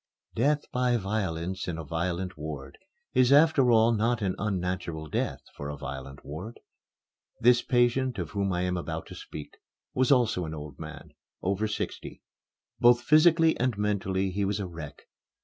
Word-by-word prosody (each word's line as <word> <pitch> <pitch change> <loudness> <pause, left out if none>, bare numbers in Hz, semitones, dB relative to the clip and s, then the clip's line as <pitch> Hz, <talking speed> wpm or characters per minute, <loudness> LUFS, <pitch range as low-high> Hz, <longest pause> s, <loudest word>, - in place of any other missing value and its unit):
Death 145 +5 +2
by 125 -1 +2
violence 95 -3 -2
in 85 -2 -3
a 80 - -5
violent 85 +4 -2
ward 75 -3 -7 0.3
is 130 0 +4
after 145 -3 +6
all 115 0 +5
not 115 0 +1
an 95 -2 +1
unnatural 90 -5 -2
death - - -2
for 70 0 -6
a 75 - -5
violent 70 +1 -7
ward. 90 +11 -7 0.8
The 120 +1 +5
patient 125 +1 +2
of - - -4
whom 100 -1 -1
I 90 0 0
am 90 0 0
about 80 -1 -4
to - - -8
speak 75 - -9 0.4
was 130 +1 +2
also 120 -9 +3
an 80 0 -5
old 75 -2 -9
man 80 -2 -9 0.3
over 100 +3 0
sixty. 105 - -5 0.6
Both 120 0 +5
physically 160 +3 +5
and 125 -3 0
mentally 95 -2 0
he 100 +2 -1
was 100 +1 0
a 100 - -2
wreck. 85 -5 -9
95 Hz, 165 wpm, -28 LUFS, 80-120 Hz, 0.8 s, after